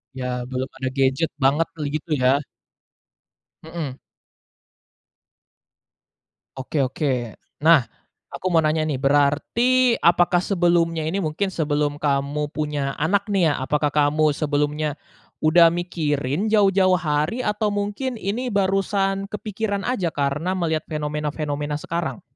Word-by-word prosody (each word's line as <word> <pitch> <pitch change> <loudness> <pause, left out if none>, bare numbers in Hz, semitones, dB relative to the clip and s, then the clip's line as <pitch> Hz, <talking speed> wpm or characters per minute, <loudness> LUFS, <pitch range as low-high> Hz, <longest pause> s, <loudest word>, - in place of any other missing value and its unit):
Iya 130 - -4 0.3
belum 130 +1 -3
ada 130 -1 -3
gadget 135 +4 +2
banget 145 +5 +3
tuh 155 - -5
gitu 155 +2 -5
ya. 125 - +5 1.4
Mhm. 160 -5 -6 2.6
Oke 135 +3 -3
oke 130 -4 -2 0.2
nah, 160 -1 +5 0.5
aku - - -9
mau 165 - +5
nanya 155 0 +1
nih 140 -4 -2
berarti 225 - +3
apakah 175 +1 +4
sebelumnya 170 -3 +1
ini 165 +5 -2
mungkin 185 +3 -1
sebelum 145 -4 -1
kamu 145 +1 -1
punya 145 -3 -2
anak 200 +6 +1
nih 175 -5 +3
ya - - 0
apakah 145 +2 0
kamu 150 +1 +2
sebelumnya, 150 0 -1 0.5
udah 165 +2 +6
mikirin 155 -2 -1
jauh-jauh 195 -3 +4
hari 155 +7 -1
atau 210 -1 0
mungkin 205 +6 -2
ini 220 +5 -3
barusan 195 0 +1
kepikiran 205 -1 -3
aja 185 -10 -1
karena 145 +6 -1
melihat 160 -4 -1
fenomena-fenomena 150 -1 -3
sekarang? 170 +3 -3
155 Hz, 120 wpm, -22 LUFS, 145-190 Hz, 2.6 s, udah